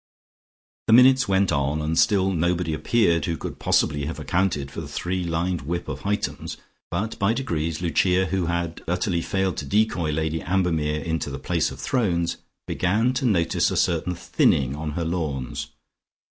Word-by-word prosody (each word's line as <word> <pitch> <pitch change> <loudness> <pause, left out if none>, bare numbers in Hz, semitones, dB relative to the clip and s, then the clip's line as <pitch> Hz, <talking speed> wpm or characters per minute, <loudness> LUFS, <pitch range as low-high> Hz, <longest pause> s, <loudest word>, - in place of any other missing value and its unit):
The 110 - +5
minutes 130 +1 +6
went 95 0 +2
on, 70 +1 0
and 80 +1 -1
still 95 +2 +3
nobody 85 -1 0
appeared 85 +2 +2
who 85 -1 -2
could - - -7
possibly 70 -1 +1
have 80 - -4
accounted 85 -7 0
for 80 - -5
the 75 - -7
three 90 +5 -2
lined 85 +1 -1
whip 85 +5 -3
of - - -4
Hightums, 105 +1 -3 0.3
but 105 +6 -3
by 100 +3 +3
degrees 85 - -2
Lucia, 90 +2 +2
who 95 -1 -1
had 85 -1 -2
utterly 90 0 0
failed 95 0 -1
to 75 - -4
decoy 95 -1 +1
Lady 80 +1 -1
Ambermere 80 -5 0
into 80 -3 -2
the - - -5
place - - 0
of - - -10
thrones, 90 -9 0 0.3
began 110 +8 +1
to 130 +1 -1
notice 85 -8 +2
a - - -2
certain 90 +1 +1
thinning 70 -4 +1
on 75 0 -4
her 85 +1 -2
lawns. 75 -7 -3
85 Hz, 170 wpm, -24 LUFS, 80-95 Hz, 0.3 s, minutes